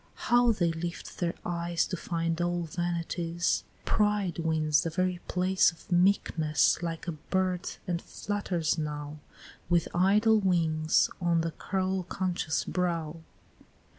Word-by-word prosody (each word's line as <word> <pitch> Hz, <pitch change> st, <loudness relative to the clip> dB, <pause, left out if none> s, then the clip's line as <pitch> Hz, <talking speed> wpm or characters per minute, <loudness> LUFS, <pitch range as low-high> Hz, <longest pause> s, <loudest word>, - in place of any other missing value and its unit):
How 240 Hz, 0 st, +3 dB
they 175 Hz, -6 st, +1 dB
lift 170 Hz, +1 st, -6 dB
their 170 Hz, -2 st, -1 dB
eyes 170 Hz, -1 st, 0 dB
to 185 Hz, -, -4 dB
find 165 Hz, -1 st, -2 dB
Old 175 Hz, -2 st, -1 dB
vanities! 170 Hz, 0 st, -1 dB, 0.2 s
Pride 210 Hz, -4 st, +1 dB
wins 155 Hz, -2 st, +2 dB
the 165 Hz, -, -2 dB
very 180 Hz, +1 st, -1 dB
place 185 Hz, +1 st, +3 dB
Of 165 Hz, -, -19 dB
meekness, 175 Hz, -5 st, +3 dB
like 165 Hz, 0 st, -4 dB
a -, -, 0 dB
bird, 180 Hz, +3 st, -1 dB, 0.2 s
and 175 Hz, -1 st, -2 dB
flutters 180 Hz, -6 st, -2 dB
now 150 Hz, -1 st, -4 dB, 0.5 s
With 170 Hz, -2 st, +3 dB
idle 210 Hz, +5 st, +4 dB
wings 160 Hz, -5 st, +2 dB
on 170 Hz, -1 st, +2 dB
the 165 Hz, 0 st, -2 dB
curl 190 Hz, +2 st, -1 dB
conscious 180 Hz, -3 st, -2 dB
brow! 170 Hz, -3 st, -1 dB
175 Hz, 130 wpm, -29 LUFS, 165-185 Hz, 0.5 s, idle